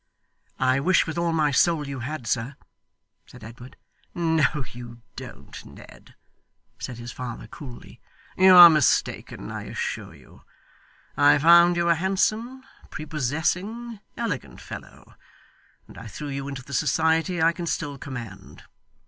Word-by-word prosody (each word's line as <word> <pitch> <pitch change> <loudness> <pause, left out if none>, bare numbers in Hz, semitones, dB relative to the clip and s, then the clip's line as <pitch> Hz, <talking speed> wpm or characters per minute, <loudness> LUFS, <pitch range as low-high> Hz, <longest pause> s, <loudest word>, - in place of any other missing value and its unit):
'I 130 +1 +2
wish 180 +6 +3
with 160 - -5
all 170 -1 0
my 155 -2 +1
soul 155 0 +2
you 140 -1 -6
had, 135 +2 -6
sir,' 120 +4 -2 0.7
said 125 -2 -15
Edward. 120 +3 -12 0.4
'No 160 -5 +1
you 120 -1 -11
don't, - - -10
Ned,' - - -15 0.6
said 125 - -6
his 120 0 -8
father 125 -2 -7
coolly; 130 -7 -12 0.3
'you 185 0 +7
are 175 -1 +12
mistaken, 155 -5 0
I - - -6
assure - - -5
you. - - -19 0.7
I 145 0 +5
found 170 +3 +6
you 170 0 +1
a 170 - +5
handsome, 215 +8 -1 0.3
prepossessing, 170 - -3 0.2
elegant 230 - -4
fellow, - - -11 0.7
and - - -13
I 115 - -9
threw 145 +6 -7
you 140 0 -5
into 135 -2 -7
the 140 - -11
society 160 +5 +1
I 165 +1 +4
can 170 0 -6
still 145 -4 -3
command. 120 -9 -9
155 Hz, 140 wpm, -24 LUFS, 130-170 Hz, 0.7 s, are